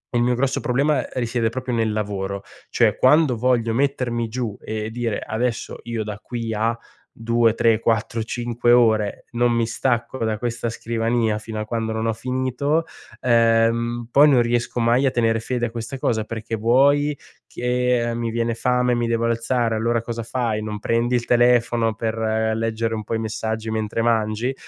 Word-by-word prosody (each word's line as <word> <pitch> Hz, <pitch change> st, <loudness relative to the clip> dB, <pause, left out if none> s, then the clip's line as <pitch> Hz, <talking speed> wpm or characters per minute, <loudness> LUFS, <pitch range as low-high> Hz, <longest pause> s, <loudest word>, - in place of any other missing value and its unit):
il 120 Hz, -, +3 dB
mio 125 Hz, 0 st, +2 dB
grosso 135 Hz, +1 st, 0 dB
problema 135 Hz, +2 st, +1 dB
risiede 120 Hz, -2 st, 0 dB
proprio 125 Hz, 0 st, -3 dB
nel 110 Hz, -1 st, +1 dB
lavoro. 100 Hz, -2 st, -3 dB, 0.3 s
Cioè -, -, +2 dB
quando 145 Hz, -1 st, +4 dB
voglio 115 Hz, -2 st, +1 dB
mettermi 120 Hz, -3 st, 0 dB
giù 115 Hz, -3 st, -4 dB
e 110 Hz, 0 st, -4 dB
dire: 115 Hz, -2 st, -2 dB
“Adesso 115 Hz, +1 st, -3 dB
io 115 Hz, -2 st, -3 dB
da 105 Hz, -1 st, -5 dB
qui 115 Hz, -2 st, -4 dB
a 115 Hz, +2 st, 0 dB, 0.4 s
2, 115 Hz, 0 st, +2 dB
3, 115 Hz, -1 st, +3 dB
4, 115 Hz, 0 st, 0 dB
5 120 Hz, +1 st, 0 dB
ore, 110 Hz, -4 st, +3 dB
non 120 Hz, 0 st, +2 dB
mi 115 Hz, -1 st, +1 dB
stacco 120 Hz, +1 st, -1 dB
da 110 Hz, -1 st, -1 dB
questa 120 Hz, 0 st, -3 dB
scrivania 115 Hz, -1 st, -1 dB
fino 110 Hz, 0 st, -5 dB
a -, -, -4 dB
quando 110 Hz, 0 st, -2 dB
non 110 Hz, +1 st, -2 dB
ho 115 Hz, -, +1 dB
finito”, 130 Hz, +6 st, -1 dB, 0.4 s
ehm, 115 Hz, 0 st, +2 dB
poi 145 Hz, +2 st, +6 dB
non 125 Hz, -4 st, +5 dB
riesco 120 Hz, +1 st, -1 dB
mai 120 Hz, +4 st, +3 dB
a 130 Hz, -, +3 dB
tenere 115 Hz, -1 st, +1 dB
fede 120 Hz, +1 st, -2 dB
a -, -, -9 dB
questa 120 Hz, +3 st, -5 dB
cosa 110 Hz, -4 st, 0 dB
perché 115 Hz, 0 st, -4 dB
vuoi 140 Hz, +6 st, +3 dB, 0.3 s
che, 125 Hz, -1 st, 0 dB
ehm, 115 Hz, -, -3 dB
mi 115 Hz, -1 st, -2 dB
viene 115 Hz, 0 st, -1 dB
fame, 125 Hz, +1 st, +1 dB
mi 120 Hz, 0 st, 0 dB
devo 115 Hz, 0 st, 0 dB
alzare, 115 Hz, 0 st, 0 dB
allora 115 Hz, +1 st, 0 dB
cosa 115 Hz, 0 st, -5 dB
fai? 115 Hz, -2 st, -2 dB
Non 105 Hz, -1 st, -5 dB
prendi 120 Hz, +3 st, 0 dB
il 120 Hz, -, +1 dB
telefono 120 Hz, -2 st, +3 dB
per 115 Hz, 0 st, -2 dB, 0.4 s
leggere 115 Hz, 0 st, -1 dB
un 110 Hz, -, -4 dB
po' -, -, -4 dB
i -, -, -1 dB
messaggi 110 Hz, 0 st, -3 dB
mentre 110 Hz, +1 st, -2 dB
mangi? 115 Hz, +2 st, 0 dB
115 Hz, 180 wpm, -22 LUFS, 110-120 Hz, 0.4 s, poi